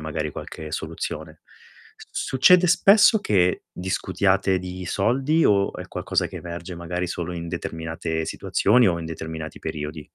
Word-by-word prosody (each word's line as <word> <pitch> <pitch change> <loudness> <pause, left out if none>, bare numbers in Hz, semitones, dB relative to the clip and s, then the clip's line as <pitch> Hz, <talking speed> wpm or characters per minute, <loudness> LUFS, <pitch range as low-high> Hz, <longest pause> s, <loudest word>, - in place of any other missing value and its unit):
magari 75 0 -3
qualche 75 -1 -8
soluzione. 80 0 -5 0.7
Succede 180 +8 +4
spesso 205 +4 +6
che 90 -3 +2
discutiate 95 +1 0
di 90 0 -7
soldi, 135 - +1
o 100 -1 +3
è - - -8
qualcosa - - -1
che - - -9
emerge, 85 +1 -7
magari, 90 +1 -3
solo 90 0 -4
in 85 -1 -5
determinate 80 -1 -4
situazioni, 115 +8 +2
o 85 -1 0
in 85 - -6
determinati 80 -1 -6
periodi? 75 0 -6
85 Hz, 135 wpm, -24 LUFS, 80-100 Hz, 0.7 s, spesso